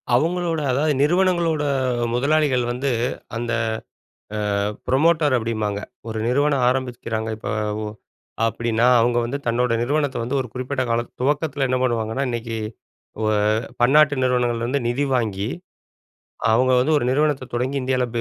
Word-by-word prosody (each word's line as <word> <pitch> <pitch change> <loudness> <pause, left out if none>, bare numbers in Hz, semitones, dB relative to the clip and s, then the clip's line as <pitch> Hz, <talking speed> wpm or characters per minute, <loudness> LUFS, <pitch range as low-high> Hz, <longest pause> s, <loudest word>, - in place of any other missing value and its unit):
அவங்களோட, 165 +3 0
அதாவது 150 +4 +2
நிறுவனங்களோட 170 -1 +2 0.5
முதலாளிகள் 140 0 +2
வந்து 130 +3 -1 0.5
அந்த 120 +1 -3 1.1
அ 100 +1 0 0.2
ப்ரமோட்டர் 150 +1 +3
அப்டிம்பாங்க. 110 -3 -2 0.3
ஒரு 110 0 -3
நிறுவனம் 140 +1 +2
ஆரமிக்கிறாங்க 120 -3 -2
இப்ப - - -6 0.3
உ - - -3 0.6
அப்டீன்னா, 115 0 0
அவங்க 120 +1 +2
வந்து 130 +4 -3
தன்னோட 120 +1 +1
நிறுவனத்த 145 +2 0
வந்து 130 +4 -1
ஒரு 130 - -6
குறிப்பிட்ட 130 +1 -2
காலத் 115 +1 0
துவக்கத்துல 145 +1 0
என்ன 130 - +2
பண்ணுவாங்கன்னா, 115 +1 0
இன்னைக்கு 115 -1 -3 0.6
ஓ - - -1 0.6
பன்னாட்டு 145 +3 +5
நிறுவனங்கள்ல 120 -2 +1
இருந்து 135 +3 0
நிதி 135 +4 0
வாங்கி, 105 -4 -1 1.1
அவங்க 130 +3 +3
வந்து 145 +5 +2
ஒரு 120 - 0
நிறுவனத்த 145 -2 +1
தொடங்கி 130 +3 -1
இந்தியாவுல 130 -1 0
130 Hz, 130 wpm, -22 LUFS, 120-145 Hz, 1.1 s, பன்னாட்டு